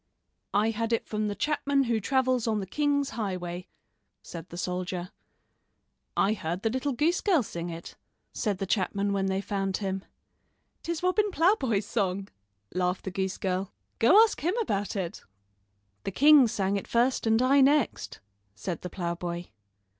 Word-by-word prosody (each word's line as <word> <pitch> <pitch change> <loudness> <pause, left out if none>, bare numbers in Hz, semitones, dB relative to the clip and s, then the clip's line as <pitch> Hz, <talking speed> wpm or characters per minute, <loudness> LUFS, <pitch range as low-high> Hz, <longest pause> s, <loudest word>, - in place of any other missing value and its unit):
"I 215 +2 +3
had 230 +1 -2
it 230 - 0
from 215 0 -2
the 205 - -2
chapman 285 -1 +1
who 230 -3 0
travels 255 +1 +1
on 215 -2 +1
the 195 - -3
king's 285 +5 0
highway," 180 -5 -4 0.6
said 170 0 -9
the 175 - -8
soldier. 180 0 -3 1.1
"I 200 +2 +3
heard 175 -2 -4
the 225 - +1
little 260 +3 -1
goose 320 +8 +1
girl 350 - +3
sing 170 -4 -5
it," 165 0 -8 0.4
said 205 -4 -1
the 195 - -2
chapman 200 +1 0
when 195 -1 0
they 190 0 0
found 195 -2 -2
him. 195 -1 -3 0.8
"'Tis 340 0 -4
Robin 410 +3 +2
Ploughboy's 300 - +2
song," 195 -2 -1 0.4
laughed 180 +1 0
the 190 - -4
goose 190 0 -2
girl. 190 +1 -2 0.3
"Go 345 - +7
ask 450 - -1
him 355 +9 0
about 205 - -1
it." 180 -4 -3 0.8
"The - - -2
king 285 +3 +7
sang 200 -2 0
it 195 - -6
first 240 0 +1
and 225 0 +4
I 270 +3 +5
next," 280 -1 +2 0.3
said 170 - -4
the 180 - -5
ploughboy. 175 0 -4
205 Hz, 160 wpm, -28 LUFS, 185-265 Hz, 1.1 s, Go